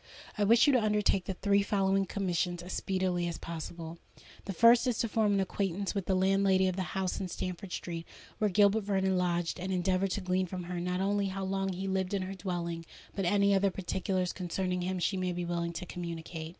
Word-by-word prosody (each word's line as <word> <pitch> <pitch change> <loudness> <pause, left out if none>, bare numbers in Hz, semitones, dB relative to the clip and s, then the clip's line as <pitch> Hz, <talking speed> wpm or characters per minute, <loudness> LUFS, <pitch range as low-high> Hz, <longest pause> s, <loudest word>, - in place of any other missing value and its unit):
"I 210 - 0
wish 230 +3 +6
you 285 - +4
to 250 - +4
undertake 210 -3 +2
the 190 - -3
three 200 +1 +2
following 195 -1 +1
commissions 175 -2 -1
as 180 - -6
speedily 185 -2 0
as 170 - -4
possible. 165 0 -7 0.5
"The 200 - -3
first 235 +5 +6
is 245 -3 +1
to 230 - 0
form 215 -2 +2
an 200 - +2
acquaintance 195 0 -1
with 195 -3 -3
the 190 - +2
landlady 190 0 +3
of 185 - -1
the 190 - -2 0.2
house 190 -1 -1
in 190 - -3
Stamford 180 +1 -5
Street 170 -2 -5 0.3
where 215 -2 +2
Gilbert 205 +3 +4
Vernon 190 -2 +1
lodged, 175 -1 0
and 185 +2 -3
endeavour 185 +1 +1
to 200 +2 -3
glean 185 0 0
from 180 0 -5
her 175 0 -4
not 180 +1 -1
only 200 0 +1
how 195 0 -4
long 195 0 -1
he 190 +1 -4
lived 190 0 0
in 190 - -1
her 190 +1 -5
dwelling, 175 -3 -3 0.3
but 195 - -1
any 200 +2 +3
other 195 0 +3
particulars 185 -1 -2
concerning 180 0 -2
him 185 +1 -2
she 190 +2 0
may 185 -1 -1
be 175 0 -3
willing 170 0 -2
to 180 - -5
communicate. 165 -2 -6
190 Hz, 215 wpm, -31 LUFS, 175-195 Hz, 0.5 s, wish